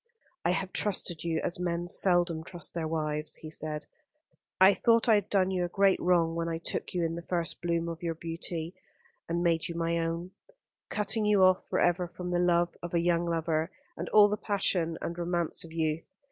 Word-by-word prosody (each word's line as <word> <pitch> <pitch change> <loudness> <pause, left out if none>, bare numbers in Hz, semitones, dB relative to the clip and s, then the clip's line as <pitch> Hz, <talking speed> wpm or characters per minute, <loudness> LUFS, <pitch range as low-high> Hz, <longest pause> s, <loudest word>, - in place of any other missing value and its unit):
"I - - +2
have 190 +1 -1
trusted 185 -5 0
you 165 -1 0
as 175 - -2
men 175 -1 -2
seldom 175 -3 +1
trust 175 0 -7
their 165 -2 -2
wives," 155 -1 -2
he 155 - -8
said. 155 -1 -4 0.7
"I 190 +2 +8
thought 230 +3 +3
I 225 - +6
had 205 -2 +2
done 190 -2 +2
you 180 -1 0
a - - 0
great 195 +1 +3
wrong 170 -2 +2
when 165 0 -2
I 165 - -2
took 170 - -4
you 175 -2 +1
in 165 - -2
the 170 - -5
first 170 -1 -2
bloom 170 -1 0
of 165 -1 -5
your 165 -1 -2
young - - -29
beauty 165 0 -4 0.6
and 170 +1 0
made 165 -2 +2
you 170 - -6
my 170 0 0
own; 165 +2 -3 0.6
cutting 210 +1 0
you 205 -2 +4
off 185 0 +4
for - - 0
ever 175 0 +2
from 180 +1 -6
the 175 - +1
love 175 -1 +2
of 175 0 -4
a - - +4
young 170 0 +2
lover, 165 -1 0 0.3
and - - -5
all 210 -1 +7
the 210 +1 -1
passion 180 -6 0
and 170 - -3
romance 175 -1 -1
of 165 - -11
youth. 160 -1 -2
170 Hz, 215 wpm, -29 LUFS, 165-180 Hz, 0.7 s, I